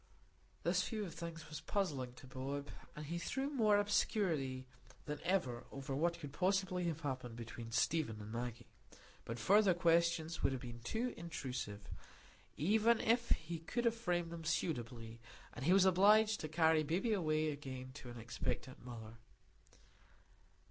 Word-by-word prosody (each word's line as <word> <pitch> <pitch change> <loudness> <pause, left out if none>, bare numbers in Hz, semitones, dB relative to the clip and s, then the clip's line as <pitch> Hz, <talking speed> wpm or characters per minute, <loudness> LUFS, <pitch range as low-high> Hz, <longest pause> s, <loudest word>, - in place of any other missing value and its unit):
This - - +2
view 215 -3 -2
of 170 - -7
things 165 -1 -6
was 150 - -6
puzzling 145 -12 -1
to 130 - -13
Bob, 135 +2 -4 0.3
and 150 - -6 0.2
threw 270 +10 -1
more 215 -7 +4
obscurity 165 -10 +1 0.4
than 150 -1 -4
ever 145 -10 0
over 135 0 -4
what 170 +4 +1
could 145 -4 -7
possibly 185 -1 +1
have 165 -2 -2
happened 130 -5 -3
between 115 0 -7
Stephen 140 -3 +1
and 105 +1 -8
Maggie. 120 0 -5 0.5
But 115 - -4
further 195 - +5
questions 170 -1 +2
would - - +3
have 130 - -4
been 120 -1 -7
too 225 - -2
intrusive, 130 -10 -5 0.7
even 220 +7 +4
if 235 +1 +2
he 165 +1 0
could 235 +9 -2
have 230 - +4
framed 175 -7 -1
them 170 -1 -6
suitably, 120 -8 -2 0.3
and 130 - -5
he 170 - +4
was 190 0 +7
obliged 210 +4 +6
to 155 - -3
carry 160 0 +4
baby 175 +9 +1
away 155 -5 +1
again 130 -3 -6
to 130 -3 -9
an 120 - -8
expectant 120 +2 -4
mother. 115 -2 -8
160 Hz, 155 wpm, -37 LUFS, 130-185 Hz, 0.7 s, was